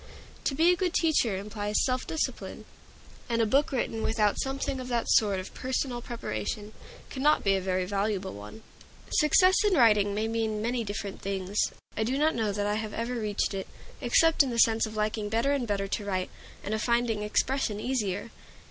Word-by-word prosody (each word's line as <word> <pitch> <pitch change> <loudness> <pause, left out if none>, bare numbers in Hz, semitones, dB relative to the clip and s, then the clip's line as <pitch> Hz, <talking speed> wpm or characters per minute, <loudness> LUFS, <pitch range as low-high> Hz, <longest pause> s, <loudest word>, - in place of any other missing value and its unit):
To 270 - 0
be 335 +4 +5
a - - +1
good 360 -1 -1
teacher 270 - +2
implies 205 +1 -1
self 255 -1 -1
discipline, 320 - -3 0.6
and 230 -1 0
a 225 - +4
book 275 +7 +2
written 230 -4 -2
without 215 -2 +1
something 270 0 -2
of 255 - -6
that 240 -2 -1
sort 205 -3 +3
of 185 - -8
personal 255 -1 -2
preparation 210 - -5 0.4
cannot 295 +3 +2
be 195 - +3
a 190 - -1
very 185 0 -1
valuable 200 0 -2
one. 105 - -10 0.5
Success 365 +4 +5
in 410 -3 +3
writing 210 -6 +4
may 215 +1 0
mean 225 -1 -1
many 235 +2 -1
different 205 -1 -5
things. 195 0 -4 0.4
I 220 - 0
do 255 +5 -1
not 310 +2 +3
know 220 -3 0
that 205 0 -2
I 210 +1 0
have 215 -1 -6
ever 230 +2 -2
reached 215 -4 -1
it, 195 -1 -4 0.3
except 325 +7 +4
in 275 - +2
the 235 - -3
sense 225 -1 +4
of 220 - -9
liking 210 0 -1
better 230 +6 +1
and 275 -4 0
better 200 -1 -1
to 210 - -2
write, 185 -2 -2 0.3
and 205 - -3
of 220 - -1
finding 235 -2 +1
expression 210 +1 0
easier. 215 -3 -2
220 Hz, 190 wpm, -28 LUFS, 205-255 Hz, 0.6 s, be